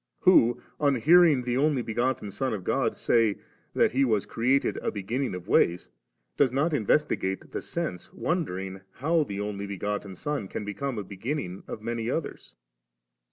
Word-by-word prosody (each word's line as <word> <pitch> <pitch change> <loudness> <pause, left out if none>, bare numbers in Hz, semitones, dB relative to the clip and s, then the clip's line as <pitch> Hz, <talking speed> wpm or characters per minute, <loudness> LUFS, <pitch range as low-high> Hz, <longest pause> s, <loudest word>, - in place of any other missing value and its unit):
who 120 -10 +5 0.2
on 145 -2 +3
hearing 155 0 +5
the 120 0 -1
Only 140 -2 +2
begotten 120 -2 -1
Son 130 +1 -1
of 95 - -7
God - - 0
say, 115 -4 +2 0.4
that - - +4
He 135 +3 +2
was 110 -6 +1
created 130 +4 +1
*a - - -2
beginning 115 +4 -2
of 90 +1 -8
ways,' 85 - +2 0.5
does 135 -4 +4
not 145 +5 +1
investigate 105 -6 0
the - - -3
sense, 155 - -4
wonder 150 - -1
ing 95 0 -6
how 160 +5 +1
the 100 -8 -5
Only 100 -1 -4
begotten 100 0 -4
Son 145 0 -3
can 105 - -5
become 115 +5 -3
a 105 - -3
B^;inning 100 0 -4
of 110 - -6
many 115 0 -2
others? 160 +4 -4
120 Hz, 165 wpm, -27 LUFS, 100-140 Hz, 0.5 s, who